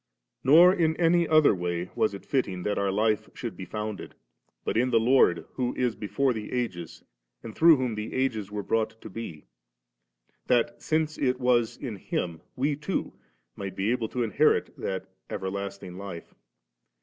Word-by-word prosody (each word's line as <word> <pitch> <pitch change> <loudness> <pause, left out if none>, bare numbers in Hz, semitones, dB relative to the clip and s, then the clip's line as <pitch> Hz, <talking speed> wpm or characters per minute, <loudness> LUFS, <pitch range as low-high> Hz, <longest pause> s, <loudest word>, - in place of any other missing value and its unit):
77. 140 +4 +5
Nor 180 +2 +8
in 160 -4 +1
any 170 0 +3
other 155 -5 +5
way 90 -1 -3
was 105 - +1
it 100 - -11
fitting 95 -10 -1
that 105 - -1
our 100 0 +1
life 105 +2 +1
should - - -5
be - - -7
founded, 105 -1 -5 0.5
but - - -1
in 125 +3 +2
the 115 -2 +4
Lord 115 -8 +4
who 125 -2 -2
is 125 -2 0
before 110 +6 0
the 110 -2 -6
ages, 95 -10 -4 0.4
and 110 - -7
Arough 165 +2 +6
whom 125 -3 -1
the 105 +1 -5
ages 115 -7 -1
were 105 -1 -3
brought 110 +1 -1
to 110 - -10
be; 85 - -7 1.0
that, 120 -1 +1
since 155 -1 0
it 130 -2 +1
was 120 -3 +2
in 120 -7 -6
Him, 85 -3 -3
we 140 +3 0
too 150 +6 -3 0.4
might 95 -1 -6
be 100 +4 0
able 120 -3 -1
to 125 - -1
inherit 110 -4 +2
that 95 -1 -4 0.2
everlasting 95 -1 -5
life. 95 -4 -8
115 Hz, 175 wpm, -27 LUFS, 100-130 Hz, 1.0 s, Nor